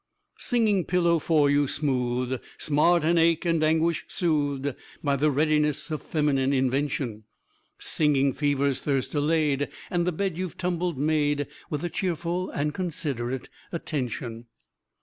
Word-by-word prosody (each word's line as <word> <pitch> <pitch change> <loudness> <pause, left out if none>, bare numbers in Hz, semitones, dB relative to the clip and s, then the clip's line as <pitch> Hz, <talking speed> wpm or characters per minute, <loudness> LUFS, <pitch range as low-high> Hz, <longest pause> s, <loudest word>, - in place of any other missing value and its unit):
Singing 220 -6 +2
pillow 170 -2 +2
for 150 -2 +3
you, 145 0 +3
smoothed; 125 -3 -1 0.2
smart 155 +3 +3
and 170 +2 +3
ache 165 +1 +3
and 165 -2 +2
anguish 160 +1 +2
soothed, 145 -5 0 0.3
By 140 -2 +2
the 150 +3 +2
readiness 150 +1 +1
of 155 -3 -2
feminine 140 -3 +1
invention; 130 -4 -1 0.5
Singing 140 -3 +2
fever's 140 -2 +1
thirst 135 -3 -1
allayed, 145 -2 +1 0.2
and 175 -1 +1
the - - +3
bed 180 0 -2
you've 185 -4 -4
tumbled 175 -3 -1
made 145 0 +1 0.2
With 150 0 -3
a - - -1
cheerful 175 +1 -2
and 150 +1 -2
considerate 140 -9 -3 0.2
attention. 120 -7 -4
150 Hz, 130 wpm, -26 LUFS, 140-170 Hz, 0.5 s, for